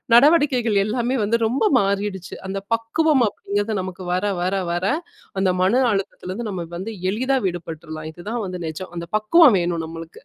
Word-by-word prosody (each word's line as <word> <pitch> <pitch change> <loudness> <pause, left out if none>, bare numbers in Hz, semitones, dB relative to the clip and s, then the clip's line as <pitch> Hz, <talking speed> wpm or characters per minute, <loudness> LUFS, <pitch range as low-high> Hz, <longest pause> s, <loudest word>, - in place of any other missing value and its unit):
நடவடிக்கைகள் 255 -6 +4
எல்லாமே 240 +4 0
வந்து 230 +3 +1
ரொம்ப 250 +5 0 0.2
மாறிடுச்சு. 195 -2 -2
அந்த 195 0 -3
பக்குவம் 260 +4 +2
அப்டிங்கறது, 205 +1 -2
நமக்கு 185 0 -7
வர, 185 +3 0 0.2
வர, 185 +2 0 0.2
வர 175 +2 -1 0.5
அந்த 190 -1 +2
மன 190 +5 +3 0.2
அழுத்தத்துலருந்து 195 +2 -4
நம்ம 190 - -4 0.2
வந்து 190 +6 -5 0.2
எளிதா 255 +6 0
விடுபட்றலாம். 160 -3 -5
இதுதான் 210 +8 -5
வந்து 180 -1 -5
நெஜம், 160 +4 -6
அந்த 170 - -4
பக்குவம் 235 +5 +6
வேணும் 170 -1 -1
நம்மளுக்கு. 165 0 -9
200 Hz, 150 wpm, -22 LUFS, 180-235 Hz, 0.5 s, பக்குவம்